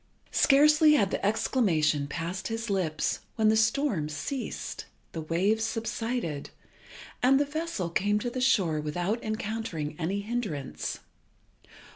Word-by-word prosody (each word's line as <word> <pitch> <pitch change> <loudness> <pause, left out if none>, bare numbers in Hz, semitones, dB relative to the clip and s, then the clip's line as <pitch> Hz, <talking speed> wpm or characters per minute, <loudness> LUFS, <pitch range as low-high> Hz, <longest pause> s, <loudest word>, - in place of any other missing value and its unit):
Scarcely 300 +2 +6
had 200 -10 +3
the - - -2
exclamation 165 - +2
passed 175 +5 -4
his 225 -1 -3
lips 170 -6 0 0.2
when 220 -1 +3
the 220 - +4
storm 220 - +1
ceased, 155 - -5 0.2
the 165 - -5
waves 190 +8 +1
subsided, 225 - -3 0.7
and 270 +2 +5
the 290 - +2
vessel 295 - -3
came 205 +4 +2
to 240 +3 -2
the 255 - -3
shore 175 -12 +2
without 175 +9 -2
encountering 215 -8 -3
any 190 +5 -1
hindrance. 205 - -4
210 Hz, 125 wpm, -28 LUFS, 165-240 Hz, 0.7 s, Scarcely